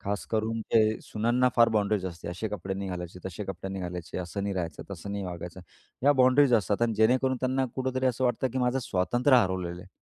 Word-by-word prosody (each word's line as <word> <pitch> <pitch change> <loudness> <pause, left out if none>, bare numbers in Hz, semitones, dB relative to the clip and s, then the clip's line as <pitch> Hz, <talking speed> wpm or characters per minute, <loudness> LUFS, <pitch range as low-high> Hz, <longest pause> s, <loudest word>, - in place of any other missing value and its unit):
खास 100 0 -3
करून 110 0 0
ते 110 0 +2
सुनांना 120 +4 +1
फार 115 -1 +6
बाउंडरीज 105 -2 +1
असते. 85 -2 -7
असे 95 +5 -3
कपडे 95 -1 -4
नाही 100 0 -4
घालायचे, 90 0 -6
तसे 95 +2 -5
कपडे 95 0 -6
नाही 95 -1 -4
घालायचे, 90 0 -5
असं 90 +2 -4
नाही 100 0 -2
राहायचं, 85 -3 -4
तसं 100 +1 -6
नाही 100 -1 -3
वागायचं, 90 0 -7 0.4
या 145 +2 +6
बाउंडरीज 130 +1 +5
असतात 105 +1 +1
आणि 115 -2 +2
जेणेकरून 130 +4 +3
त्यांना 130 +1 +1
कुठेतरी 130 0 -1
असं 130 +1 0
वाटतं 125 +1 +1
की 130 - -1
माझं 125 +1 +1
स्वातंत्र्य 120 +4 +2
हरवलेलं 90 -4 -1
आहे. 90 - -14
105 Hz, 210 wpm, -28 LUFS, 95-125 Hz, 0.4 s, फार